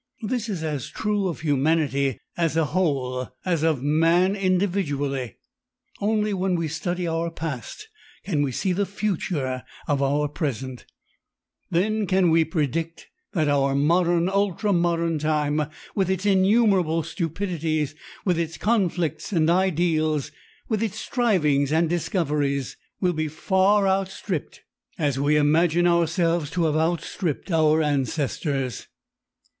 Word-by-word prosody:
This 230 +1 -2
is 180 -6 -3
as 150 -5 -3
true 210 -2 -1
of 170 - -4
humanity 140 -3 +1 0.2
as 165 -2 0
a 160 - +3
whole 135 -7 -1 0.2
as 170 -4 +1
of 155 -5 +1
man 165 +6 +3
individually. 175 - -1 0.6
Only 210 0 +1
when 185 -1 0
we 165 -2 -1
study 175 +3 -2
our 165 0 -1
past 165 - -6 0.4
can 155 -7 0
we 140 -2 0
see 185 +8 -1
the 200 +2 0
future 170 -10 -2 0.3
of 145 -1 +1
our 145 +2 +1
present, 130 -4 -4 0.8
then 210 +4 +1
can 185 -2 +3
we 165 0 +5
predict 160 +1 -3 0.2
that 160 -6 +1
our 140 -1 +2
modern, 170 +4 +2
ultra 200 +1 +1
modern 170 -2 +1
time 150 0 0 0.2
with 190 -3 0
its 190 +1 -1
innumerable 190 -4 +3
stupidities, 165 -3 -2 0.3
with 180 -4 +2
its 165 -1 -3
conflicts 180 -8 0
and 165 -3 +3
ideals, 165 -5 +1 0.4
with 220 -2 -1
its 220 -2 -2
strivings 150 - +1
and 165 +2 +3
discoveries, 145 - -1 0.3
will 180 -2 +2
be 155 -1 -1
as 150 - -9
far 195 +3 +3
outstripped 190 -3 -2 0.3
as 140 -4 0
we 145 +2 +3
imagine 165 +3 +3
ourselves 170 -2 +2
to 170 +2 -1
have 155 -2 +1
outstripped 165 +1 -1
our 160 -1 +3
ancestors. 140 -2 -1
165 Hz, 130 wpm, -24 LUFS, 150-185 Hz, 0.8 s, we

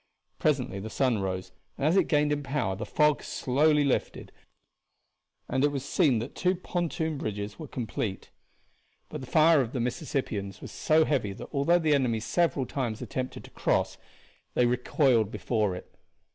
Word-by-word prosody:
Presently 130 -10 0
the 110 +3 -6
sun 125 -3 +1
rose, 95 -1 -3 0.3
and 140 - -1
as 160 +4 +3
it 190 -4 +4
gained 150 -1 +2
in 145 0 0
power 135 -9 -1
the 105 - -6
fog 150 -1 +3
slowly 150 +3 +2
lifted, 140 - -1 1.2
and 130 +1 0
it - - +6
was 140 -2 -3
seen 140 -4 +3
that 115 +4 -4
the - - -10
two 185 +1 +3
pontoon 165 -4 -2
bridges 105 -2 -4
were 155 - -6
complete; 110 -5 -4 0.8
but 150 - -6
the 130 - -8
fire 160 0 +5
of 120 -2 -4
the 130 - -2
Mississippians 120 - -3
was - - -9
so 160 -4 +3
heavy 115 -9 0
that - - -9
although 145 +5 +3
the 160 -3 +2
enemy 125 -5 +2
several 140 +2 +1
times 120 -5 -3
attempted 130 0 -4
to - - -13
cross - - 0 0.6
they 125 - +4
recoiled 125 -2 +2
before 105 -5 -1
it. - - -11
135 Hz, 175 wpm, -28 LUFS, 110-150 Hz, 1.2 s, it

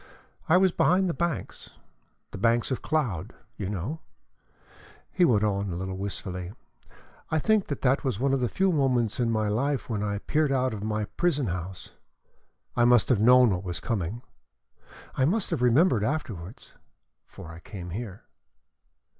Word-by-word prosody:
"I 170 - +6
was 190 0 +4
behind 185 +3 +3
the 170 - 0
banks 170 -3 -4 0.6
the - - -7
banks 115 +4 +2
of 130 - -2
cloud, 120 - -2 0.2
you 100 -2 -4
know," 105 - -4 1.1
he 180 - +2
went 110 -8 +3
on, 100 -2 0
a - - -4
little 95 +1 -4
wistfully. 95 -1 -5 0.8
"I 160 - +1
think 215 +5 +2
that 145 - -5
that 135 +1 +2
was 130 -7 -1
one 135 +1 +1
of 135 - +2
the 125 -2 0
few 190 0 +1
moments 130 - +1
in 120 -2 +1
my 110 -2 0
life 130 +7 -1
when 105 -2 -1
I 100 -1 -1
peered 150 +7 0
out 130 -2 +1
of 105 - -6
my 105 0 -1
prison 150 +1 0
house. 90 0 -6 0.8
I 120 - +3
must 120 -2 +4
have 125 -6 +3
known 125 0 +6
what 90 0 -2
was 90 -4 -4
coming. 110 - -3 0.9
I 130 - 0
must 200 +7 0
have - - -1
remembered 125 - +4
afterwards 110 - -4 0.5
for 80 - -11
I 80 - -10
came 90 -1 -8
here." 100 0 -6
120 Hz, 170 wpm, -27 LUFS, 100-140 Hz, 1.1 s, I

